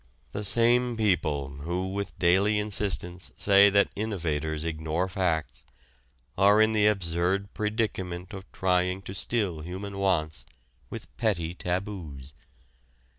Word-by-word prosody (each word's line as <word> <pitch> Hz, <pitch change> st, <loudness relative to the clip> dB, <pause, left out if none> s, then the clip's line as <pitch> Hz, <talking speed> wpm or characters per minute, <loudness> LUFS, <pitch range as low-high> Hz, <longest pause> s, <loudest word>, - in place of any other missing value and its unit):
The 105 Hz, -, -4 dB
same 120 Hz, +3 st, +3 dB
people 75 Hz, -9 st, 0 dB
who 90 Hz, +6 st, -3 dB
with 100 Hz, 0 st, -4 dB
daily 95 Hz, +4 st, +3 dB
insistence 95 Hz, -7 st, -2 dB
say 100 Hz, 0 st, +6 dB
that 100 Hz, 0 st, +3 dB
innovators 80 Hz, -7 st, -2 dB
ignore 80 Hz, +2 st, -1 dB
facts 80 Hz, -, -2 dB, 0.7 s
are 100 Hz, +2 st, +5 dB
in 110 Hz, 0 st, +5 dB
the 105 Hz, -1 st, +3 dB
absurd 95 Hz, 0 st, 0 dB
predicament 95 Hz, -5 st, -2 dB
of 95 Hz, -1 st, -9 dB
trying 90 Hz, 0 st, 0 dB
to 95 Hz, -, -7 dB
still 100 Hz, -4 st, -1 dB
human 95 Hz, +5 st, -6 dB
wants 80 Hz, -6 st, 0 dB, 0.4 s
with -, -, -9 dB
petty 85 Hz, -7 st, 0 dB
taboos. 90 Hz, -7 st, -5 dB
95 Hz, 120 wpm, -27 LUFS, 85-100 Hz, 0.7 s, say